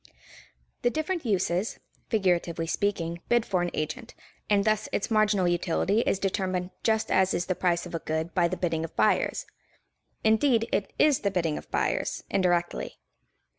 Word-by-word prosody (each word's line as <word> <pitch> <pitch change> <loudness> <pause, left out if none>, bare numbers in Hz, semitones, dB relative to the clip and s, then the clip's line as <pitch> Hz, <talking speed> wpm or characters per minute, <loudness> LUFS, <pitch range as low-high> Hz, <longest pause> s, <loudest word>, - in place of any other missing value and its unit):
The 245 - +3
different 315 +1 -2
uses, 190 0 0 0.3
figuratively 175 -6 +1
speaking, 170 -1 -1
bid 240 -1 +3
for 185 -3 0
an 175 - 0
agent, 230 +11 -4 0.3
and 205 -1 +3
thus 215 -1 +1
its 205 - -2
marginal 210 -4 +3
utility 175 +4 +1
is - - +2
determined 185 -1 -1
just 220 -1 +1
as 190 0 +3
is 175 - -1
the 185 - 0
price 175 -1 0
of 175 - -9
a 165 - -1
good 160 +1 -3
by 175 -2 +3
the 180 +2 -3
bidding 165 -3 -1
of 165 - -7
buyers. - - +2 0.8
Indeed, 225 +1 +3
it 200 - -1
is 300 -3 +4
the 200 - 0
bidding 170 -5 0
of - - -8
buyers, - - -1
indirectly. 175 -3 0
185 Hz, 165 wpm, -27 LUFS, 175-215 Hz, 0.8 s, is